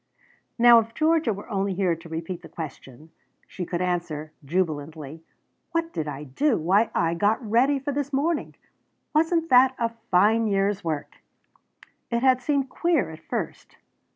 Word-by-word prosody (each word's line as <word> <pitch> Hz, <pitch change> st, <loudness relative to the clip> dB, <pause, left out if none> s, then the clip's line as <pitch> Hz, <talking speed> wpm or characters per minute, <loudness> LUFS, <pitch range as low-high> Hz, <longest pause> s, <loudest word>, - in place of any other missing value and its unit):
Now 235 Hz, -1 st, +8 dB
if 230 Hz, 0 st, -5 dB
Georgia 315 Hz, -5 st, +2 dB
were 200 Hz, 0 st, -7 dB
only 195 Hz, -3 st, -1 dB
here 180 Hz, -3 st, +1 dB
to 165 Hz, +1 st, -13 dB
repeat 165 Hz, +2 st, -5 dB
the -, -, -12 dB
question, 150 Hz, -1 st, -9 dB, 0.3 s
she 180 Hz, -3 st, -6 dB
could 175 Hz, 0 st, -2 dB
answer 170 Hz, -4 st, -3 dB
jubilantly: 155 Hz, -1 st, -3 dB, 0.5 s
"What 330 Hz, 0 st, -1 dB
did 155 Hz, -1 st, -3 dB
I 145 Hz, 0 st, -5 dB
do? 220 Hz, -, +1 dB
Why, 195 Hz, +8 st, +2 dB
I 165 Hz, 0 st, +2 dB
got 205 Hz, +6 st, +2 dB
ready 255 Hz, +6 st, +3 dB
for 275 Hz, +2 st, -3 dB
this 285 Hz, 0 st, -3 dB
morning! 295 Hz, +4 st, -1 dB, 0.6 s
Wasn't 330 Hz, +1 st, +2 dB
that 260 Hz, +1 st, +6 dB
a 230 Hz, -1 st, 0 dB, 0.2 s
fine 215 Hz, +5 st, +4 dB
year's 200 Hz, 0 st, 0 dB
work?" 155 Hz, -3 st, -4 dB, 0.9 s
It 235 Hz, +1 st, -1 dB
had 260 Hz, -1 st, +4 dB
seemed 275 Hz, 0 st, 0 dB
queer 325 Hz, -, 0 dB
at 160 Hz, -, -10 dB
first. 160 Hz, -, -6 dB
200 Hz, 155 wpm, -25 LUFS, 165-260 Hz, 0.9 s, Now